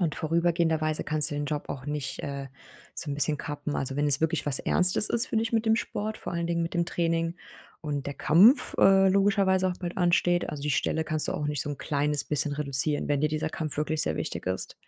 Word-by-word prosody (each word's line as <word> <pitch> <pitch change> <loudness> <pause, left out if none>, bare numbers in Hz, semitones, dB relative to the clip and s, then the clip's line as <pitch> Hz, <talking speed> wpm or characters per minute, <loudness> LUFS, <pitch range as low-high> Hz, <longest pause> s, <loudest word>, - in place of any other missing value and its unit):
Und 165 -4 -1
vorübergehenderweise 160 -1 0
kannst 155 -1 +4
du 145 - -4
den 145 - -2
Job 145 0 -4
auch 135 0 -7
nicht, 145 -2 -4
äh, 140 -1 -6 0.5
so - - -4
'n - - -2
bisschen 150 +1 0
kappen. 145 0 -5
Also, 135 0 -3
wenn 145 +1 +1
es 140 0 +3
wirklich 160 0 -1
was 145 -3 +4
Ernstes 185 +3 +4
ist, 235 +2 +3
finde 225 -2 0
ich, 230 - -5
mit 225 0 0
dem 220 0 +3
Sport, 215 -1 -4
vor - - -7
allen 170 0 -2
Dingen 170 0 -1
mit 165 - -6
dem 170 -1 +1
Training 165 0 -2 0.4
und 145 -3 -4
der 140 - -5
Kampf, 205 - +4
äh, 195 0 +5
logischerweise 195 -1 +2
auch 180 - -3
bald 175 -1 -6
ansteht. 175 -1 +1
Also, 145 -2 -7
die 150 - -1
Stelle 160 +3 -1
kannst 155 -2 +1
du - - 0
auch 150 - -3
nicht 150 -1 -1
so 145 - -5
'n 145 - -6
kleines 145 -1 -1
bisschen 150 0 0
reduzieren, 145 0 0
wenn 145 -1 0
dir 155 - +1
dieser 155 +1 -3
Kampf 155 -2 -5
wirklich 155 +1 0
sehr - - -2
wichtig - - -5
ist. 95 0 -3
155 Hz, 240 wpm, -27 LUFS, 145-175 Hz, 0.5 s, äh